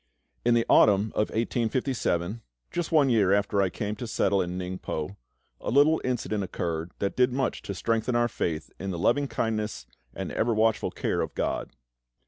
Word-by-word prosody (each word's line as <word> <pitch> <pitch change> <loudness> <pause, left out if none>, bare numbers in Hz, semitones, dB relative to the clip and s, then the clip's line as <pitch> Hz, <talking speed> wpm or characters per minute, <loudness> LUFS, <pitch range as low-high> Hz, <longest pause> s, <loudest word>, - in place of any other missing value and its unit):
In 120 0 +4
the 115 - +2
autumn 105 +1 +5
of 105 - +1
1857, 115 -4 -1 0.3
just 175 -1 -2
one 150 -4 +5
year 105 -5 +4
after 100 0 +2
I 95 - +2
came 105 +3 -3
to 120 - -5
settle 100 -3 +2
in 90 0 -3
Ningpo, 90 -1 -4 0.4
a - - -4
little 145 +5 +4
incident 110 -5 -1
occurred 85 -2 -3
that 100 - -2
did 125 0 +3
much 135 +2 -1
to 100 - -5
strengthen 115 +4 0
our 120 0 +3
faith 80 -8 -3
in 95 - -4
the 90 - -3
loving 130 +11 +2
kindness 110 - -2 0.3
and - - -4
ever 115 0 +1
watchful 110 0 +2
care - - -1
of - - -4
GOD. - - -1
110 Hz, 175 wpm, -27 LUFS, 95-120 Hz, 0.4 s, autumn